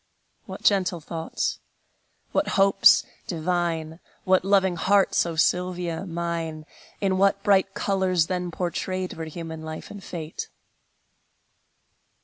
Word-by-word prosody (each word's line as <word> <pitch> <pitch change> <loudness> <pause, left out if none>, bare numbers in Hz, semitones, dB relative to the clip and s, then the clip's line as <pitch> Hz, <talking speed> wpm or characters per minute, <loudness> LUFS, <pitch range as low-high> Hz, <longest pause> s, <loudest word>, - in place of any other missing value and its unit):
What - - -8
gentle 185 -4 +2
thoughts, 160 +1 -3 0.7
what - - +1
hopes 195 0 +6 0.2
divine, 165 -1 -2 0.2
What 185 -1 +3
loving 190 -2 +3
hearts, 195 0 +3
O 165 - -4
Sylvia 180 +1 0
mine! 165 -2 -3 0.4
In 190 -2 +1
what 200 0 +3
bright 195 -2 +3
colors 190 -4 +1
then 180 0 -2
portrayed 185 +2 -3
Were 160 - -6
human 160 0 -7
life 160 0 -7
and 205 -2 -9
fate! 160 -2 -6
180 Hz, 115 wpm, -25 LUFS, 165-190 Hz, 0.7 s, hopes